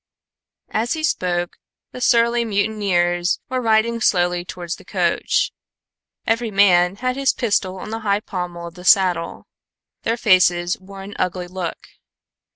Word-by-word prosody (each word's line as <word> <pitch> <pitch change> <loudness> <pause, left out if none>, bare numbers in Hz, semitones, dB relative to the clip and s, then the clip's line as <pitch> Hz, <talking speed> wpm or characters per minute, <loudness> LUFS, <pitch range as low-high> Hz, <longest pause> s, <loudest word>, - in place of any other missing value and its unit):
As 225 +2 0
he 315 -1 -4
spoke, 175 - -1 0.3
the 250 - -9
surly 235 0 +3
mutineers 200 -5 0
were 255 0 -1
riding 230 0 +2
slowly 175 -3 +2
towards 175 -1 -6
the - - -15
coach. - - 0 0.7
Every 230 +1 0
man 190 -3 +4
had 255 +4 -2
his 275 -1 +2
pistol 200 -6 -1
on 215 - -8
the 225 - -3
high 205 -1 0
pommel 180 -4 -5
of 170 - -8
the 180 +1 -12
saddle. 180 -4 +2 0.6
Their 230 +1 -1
faces 180 -4 +3
wore 195 0 -11
an 200 +1 -9
ugly 180 0 -2
look. 180 -2 -4
195 Hz, 145 wpm, -20 LUFS, 175-225 Hz, 0.7 s, man